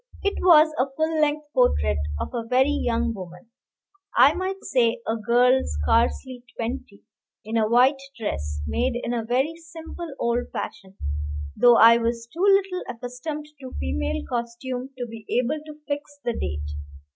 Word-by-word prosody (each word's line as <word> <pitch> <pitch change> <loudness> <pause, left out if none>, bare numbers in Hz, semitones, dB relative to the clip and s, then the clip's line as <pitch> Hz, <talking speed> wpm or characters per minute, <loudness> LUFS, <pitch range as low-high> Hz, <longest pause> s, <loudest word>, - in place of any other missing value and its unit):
It 400 0 -1
was 315 -3 +6
a 260 +2 +2
full 315 0 +1
length 300 0 +1
portrait 75 - +2 0.2
of - - -3
a 235 -2 -2
very 260 +4 +3
young 240 -4 0
woman 185 +2 -10 0.7
I 285 - +7
might 375 +2 -4
say 240 -3 +2
a 225 - +1
girl 245 +4 +3
scarcely 240 +2 0
twenty 230 -3 -5 0.4
in 220 +1 -4
a 220 -1 +2
white 260 +4 +4 0.2
dress, 75 - -3
made 75 - 0
in 240 0 -3
a 235 -2 -1
very 260 +8 0
simple 330 0 -9
old 235 +1 -1
fashion, 195 -3 -6 0.6
though 240 -1 +6
I 230 +1 +8
was 230 0 -1
too 340 - -5
little 390 -2 +3
accustomed 250 +5 -6
to 260 -2 -9
female 75 +2 -2
costume 245 +2 -4
to 245 - -3
be 225 -2 -10 0.2
able 290 +5 -1
to 305 0 -10
fix 290 0 -4
the 240 -1 -1
date. 75 - -4
245 Hz, 155 wpm, -24 LUFS, 225-295 Hz, 0.7 s, I